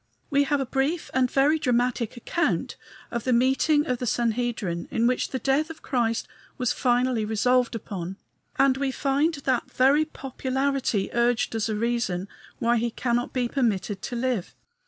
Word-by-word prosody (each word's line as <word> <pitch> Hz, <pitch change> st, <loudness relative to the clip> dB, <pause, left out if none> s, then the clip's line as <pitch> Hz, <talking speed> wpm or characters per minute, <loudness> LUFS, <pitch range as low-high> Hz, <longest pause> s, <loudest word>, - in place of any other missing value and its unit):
We 285 Hz, 0 st, +3 dB
have 290 Hz, +1 st, +1 dB
a 270 Hz, -, -1 dB
brief 275 Hz, +6 st, -1 dB
and 255 Hz, -1 st, +2 dB
very 290 Hz, +5 st, +3 dB
dramatic 245 Hz, -2 st, 0 dB
account 340 Hz, +8 st, -1 dB, 0.4 s
of 235 Hz, -2 st, -2 dB
the 255 Hz, -, 0 dB
meeting 265 Hz, +5 st, +3 dB
of 250 Hz, -1 st, -1 dB
the 250 Hz, -, -3 dB
Sanhedrim 230 Hz, -7 st, -1 dB
in 230 Hz, -, +1 dB
which 250 Hz, +1 st, +1 dB
the 260 Hz, -, -2 dB
death 275 Hz, +4 st, +1 dB
of 320 Hz, -1 st, -10 dB
Christ 230 Hz, -4 st, 0 dB, 0.3 s
was 250 Hz, -2 st, 0 dB
finally 245 Hz, -2 st, +1 dB
resolved 240 Hz, +3 st, +2 dB
upon, 190 Hz, -4 st, -5 dB, 0.4 s
and 270 Hz, -1 st, +4 dB
we 275 Hz, 0 st, 0 dB
find 280 Hz, +4 st, +1 dB
that 265 Hz, -3 st, -1 dB
very 280 Hz, +4 st, +4 dB
popularity 265 Hz, -5 st, -2 dB
urged 235 Hz, 0 st, +1 dB
as 225 Hz, 0 st, -1 dB
a 215 Hz, -, -1 dB
reason 225 Hz, -5 st, -1 dB, 0.3 s
why 235 Hz, +1 st, +2 dB
he 235 Hz, +1 st, 0 dB
cannot 240 Hz, +1 st, -1 dB
be 250 Hz, -2 st, 0 dB
permitted 210 Hz, -6 st, -1 dB
to 245 Hz, -, -5 dB
live. 240 Hz, -6 st, -2 dB
250 Hz, 165 wpm, -25 LUFS, 230-270 Hz, 0.4 s, and